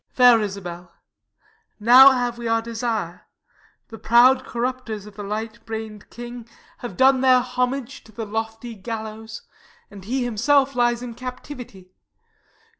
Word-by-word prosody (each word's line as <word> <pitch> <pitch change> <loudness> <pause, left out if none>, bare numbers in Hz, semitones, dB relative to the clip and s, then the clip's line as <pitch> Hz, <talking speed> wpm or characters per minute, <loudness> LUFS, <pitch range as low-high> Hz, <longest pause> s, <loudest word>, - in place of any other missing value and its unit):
_ - - -39
Fair 245 -3 +6
Isabel, 180 -4 -6 0.9
now 250 +5 +9
have 245 -2 -1
we 235 - -4
our 225 0 +1
desire; 225 -6 -4 0.6
The 225 -2 -10
proud 255 +3 +5
corrupters 235 -4 -4
of 210 -1 -13
the 205 - -8
light 215 +2 -5
brain'd 220 -2 -7
king 240 -1 -9 0.3
Have 220 -7 -8
done 265 0 +4
their 255 -1 +5
homage 250 +1 -3
to 220 - -16
the 220 +1 -6
lofty 225 +2 -5
gallows, 220 +1 -7 0.5
And 200 -2 -11
he 250 +6 -2
himself 270 +4 +2
lies 240 -1 +1
in 240 -1 -6
captivity. 245 -6 -9
235 Hz, 140 wpm, -22 LUFS, 215-250 Hz, 0.9 s, now